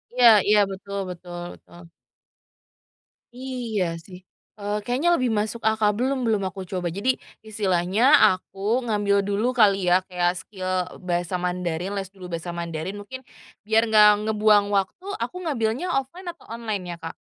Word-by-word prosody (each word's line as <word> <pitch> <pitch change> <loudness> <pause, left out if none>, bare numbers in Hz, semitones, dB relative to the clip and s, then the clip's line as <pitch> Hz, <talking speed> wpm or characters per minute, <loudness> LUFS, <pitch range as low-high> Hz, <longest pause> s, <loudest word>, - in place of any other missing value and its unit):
Iya 245 -1 +6 0.2
iya. 210 0 +5
Betul 200 +1 -7
betul 175 0 -8
betul. 175 - -16 1.5
Iya 235 -9 -3
sih. 180 -2 -11 0.4
Eee, 205 +1 -2
kayaknya 285 +10 +2
lebih 255 -5 0
masuk 220 +2 -3
akal. 220 -1 +2
Belum 260 +3 0
belum 215 -3 +1
aku 190 -2 -8
coba, 180 -1 -3
jadi 205 +9 0 0.3
istilahnya 195 0 0 0.2
aku 185 +1 -3 0.3
ngambil 205 -3 +1
dulu 215 +5 0
kali, 200 -5 +4
ya, 180 +1 +4
kayak 180 -1 0
skill 185 -2 -7 0.3
bahasa 175 -1 -2
Mandarin, 180 +1 -2
les 195 -1 -4
dulu 185 -2 -10
bahasa 170 0 -5
Mandarin, 170 +2 -5
mungkin 260 +6 -9 0.4
biar 220 +1 +3
enggak 215 -1 +7 0.2
ngebuang 210 -1 +4
waktu 195 - -1 0.2
aku - - -6
ngambilnya 245 +3 -1
offline 305 +8 -5
atau 340 - -11
online 220 -4 -4
ya, - - -9
Kak? 165 0 -7
205 Hz, 150 wpm, -24 LUFS, 180-225 Hz, 1.5 s, enggak